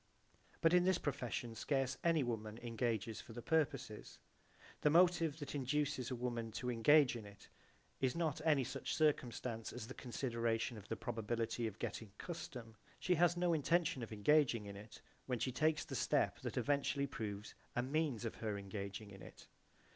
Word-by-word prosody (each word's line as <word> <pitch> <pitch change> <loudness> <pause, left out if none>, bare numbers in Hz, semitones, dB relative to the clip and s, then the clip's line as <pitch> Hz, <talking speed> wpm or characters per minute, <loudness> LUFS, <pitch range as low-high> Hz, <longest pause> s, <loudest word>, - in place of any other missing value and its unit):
But 165 +1 +5
in 180 0 +6
this 185 -1 +4
profession 125 -6 -3
scarce 130 +2 0
any 165 -3 +4
woman 110 -3 -3
engages 115 -1 -1
for 115 - -12
the[se] 120 +1 -8
purposes. 155 -9 0 0.6
The 150 - +5
motive 170 -2 +4
that 145 -3 -6
induces 140 -2 0
a 130 - -2
woman 120 -2 -3
to 125 +2 -2
engage 130 +3 +5
in 115 - -5
it 100 -1 -14 0.5
is 130 -2 +1
not 160 -3 0
any 150 -4 +4
such - - -3
circumstance 125 -7 0
as 125 -3 -6
the 130 - -7
consideration 115 -2 -1
of 105 -1 -10
the 115 - -2
probability 115 0 -2
of 105 -1 -6
getting 110 -3 -4
custom. 125 - -7 0.2
She 180 - +2
has 175 0 +4
no 175 -1 +3
intention 165 -2 +2
of 115 - -6
engaging 115 +1 +3
in 100 0 -7
it 105 +2 -11 0.3
when 125 -2 0
she 130 - -1
takes 155 +4 +2
the - - -7
step - - +1
that - - -5
eventually 140 0 +1
proves 105 -6 -5 0.2
a 125 - +1
means 140 -4 0
of 115 - -2
her 105 -3 -2
engaging 100 +1 -6
in 95 -1 -11
it. - - -12
125 Hz, 175 wpm, -38 LUFS, 115-150 Hz, 0.6 s, in